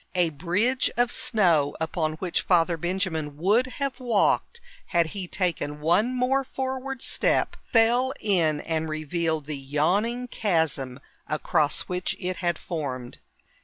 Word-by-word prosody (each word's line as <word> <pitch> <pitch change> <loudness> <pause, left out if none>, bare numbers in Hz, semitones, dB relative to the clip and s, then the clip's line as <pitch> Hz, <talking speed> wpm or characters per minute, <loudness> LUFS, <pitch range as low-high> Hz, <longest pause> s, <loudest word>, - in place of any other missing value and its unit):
A 175 -3 +2
bridge 185 - +1
of 245 0 +3
snow, 170 - +2
upon 160 -1 -1
which 175 +2 -1
Father 170 -1 +3
Benjamin 165 -4 -2
would 210 +10 +3
have 275 -2 -2
walked 245 - +1 0.3
had 170 -2 +2
he 190 -3 -3
taken 170 -6 -2
one 185 +11 +2
more 260 +2 +2
forward 265 0 -4
step, - - +1 0.2
fell 240 +3 +4
in 165 -8 +1
and 160 -1 -2
revealed 155 0 -2
the 150 -2 -4
yawning 195 - 0
chasm 160 - -1 0.3
across 155 0 +1
which 180 0 -3
it 180 0 -3
had 175 -1 0
formed. 130 -7 -5
175 Hz, 130 wpm, -26 LUFS, 155-230 Hz, 0.3 s, fell